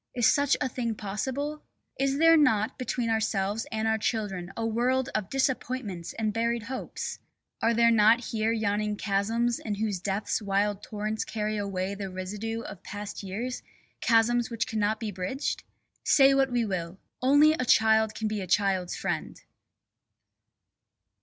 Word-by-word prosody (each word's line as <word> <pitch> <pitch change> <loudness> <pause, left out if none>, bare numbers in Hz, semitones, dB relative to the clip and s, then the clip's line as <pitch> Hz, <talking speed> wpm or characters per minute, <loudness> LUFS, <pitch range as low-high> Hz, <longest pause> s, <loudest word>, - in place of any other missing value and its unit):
Is 240 -2 +2
such 285 +2 +4
a - - 0
thing 235 -2 -3
possible? 265 +9 -3 0.4
Is 275 0 +1
there 330 +1 +6
not 225 -6 +2
between 245 -2 -1
ourselves 215 -1 0
and 220 0 -1
our 220 0 +1
children 195 -6 -2
a 225 - -1
world 250 +4 +1
of 210 -3 -2
disappointments 255 -9 -2
and 215 -2 -1
buried 230 +1 0
hopes? 260 +2 -5 0.4
Are 230 +1 +2
there 235 0 +5
not 225 +1 +5
here 220 0 +1
yawning 210 -1 0
chasms 225 +4 0
in 210 -2 -3
whose 205 -2 -1
depths 195 +4 -1
wild 200 0 0
torrents 215 +1 -3
carry 215 -1 -3
away 195 -1 -2
the 200 -1 -5
residue 205 +5 -4
of 195 -5 -9
past 205 0 -6
years, 220 +6 -4 0.4
chasms 235 +1 +3
which 235 -1 -1
cannot 215 0 0
be 220 -2 -3
bridged? 190 +9 -3 0.4
Say 275 -1 +6
what 270 -1 +2
we 240 -2 +1
will, 180 -3 -4 0.2
only 290 +4 +6
a 285 - -1
child 220 -2 +4
can 220 - -2
be 215 -1 -2
a 185 - -5
child's 190 -1 +1
friend! - - -3
220 Hz, 155 wpm, -28 LUFS, 205-240 Hz, 0.4 s, there